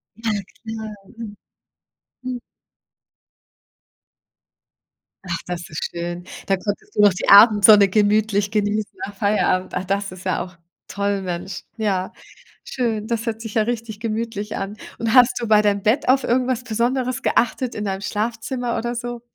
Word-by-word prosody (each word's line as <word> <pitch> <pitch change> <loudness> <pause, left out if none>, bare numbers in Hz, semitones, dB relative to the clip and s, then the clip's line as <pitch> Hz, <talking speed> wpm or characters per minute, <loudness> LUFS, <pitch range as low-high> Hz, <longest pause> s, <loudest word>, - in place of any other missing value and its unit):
Ja 225 0 -2 0.3
klar, 220 -1 -6 0.2
mhm. 210 -3 -7 0.9
Hm. 255 -1 -4 2.9
Ach, 175 -2 -1
das 175 -1 -5
ist 155 - -4
schön. 175 +1 -5 0.2
Da 195 - +2
konntest 205 +2 -5
du - - +3
noch 205 -2 +6
die 185 - -4
Abendsonne 205 -1 +8
gemütlich 205 0 +2
genießen 210 0 0
nach 200 - -10
Feierabend. 200 -3 +1
Ach, - - -1
das 195 0 -1
ist 185 0 -11
ja 185 - 0
auch 180 -1 -13 0.3
toll, 200 0 -1
Mensch. 180 +1 -5
Ja, 195 -4 -1 0.5
schön. 225 -5 -2
Das 230 -1 -2
hört 225 -1 -3
sich 225 -1 -7
ja 220 - +4
richtig 225 -2 -4
gemütlich 220 -1 -3
an. 195 +2 -5 0.2
Und 230 -1 -1
hast 250 -1 +7
du 235 - -2
bei 210 -1 +5
deinem 200 -1 +1
Bett 225 +6 +2
auf 265 +1 +4
irgendwas 250 0 0
Besonderes 245 +2 -1
geachtet 240 +1 0
in 210 - -3
deinem 195 0 -3
Schlafzimmer 235 +4 -2
oder 240 +1 -3
so? 240 0 -5
215 Hz, 150 wpm, -21 LUFS, 200-230 Hz, 2.9 s, Abendsonne